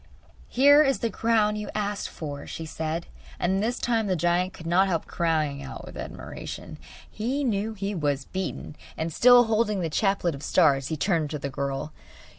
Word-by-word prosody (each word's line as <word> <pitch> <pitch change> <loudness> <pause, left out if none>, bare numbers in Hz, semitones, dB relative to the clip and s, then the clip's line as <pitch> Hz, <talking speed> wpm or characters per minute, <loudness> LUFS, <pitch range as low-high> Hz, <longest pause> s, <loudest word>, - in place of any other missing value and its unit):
'Here 285 +4 +6
is 275 -3 +3
the 230 -2 -2
crown 215 -1 +2
you 210 0 -5
asked 205 -1 -2
for,' 145 -3 -7
she 165 - -6
said; 160 +1 -3 0.3
and 190 +2 +1
this 235 +3 0
time 225 -3 0
the 185 - +1
giant 175 +2 +1
could 165 - -12
not 180 +3 +3
help 170 -4 -1
crying 155 -4 0
out 135 -1 -8
with - - -11
admiration. - - -7 0.3
He 255 +7 -2
knew 220 -2 -1
he 200 0 -3
was 145 -6 -1
beaten, 185 -5 -5 0.2
and 160 0 -3
still 245 +4 +7
holding 215 -3 +1
the 165 -2 -2
chaplet 195 -1 +1
of 140 - -8
stars, 140 -4 +3
he 160 - -3
turned 165 -2 +1
to 150 - -3
the 140 -1 -4
girl. 140 +2 -3
185 Hz, 185 wpm, -26 LUFS, 155-215 Hz, 0.3 s, still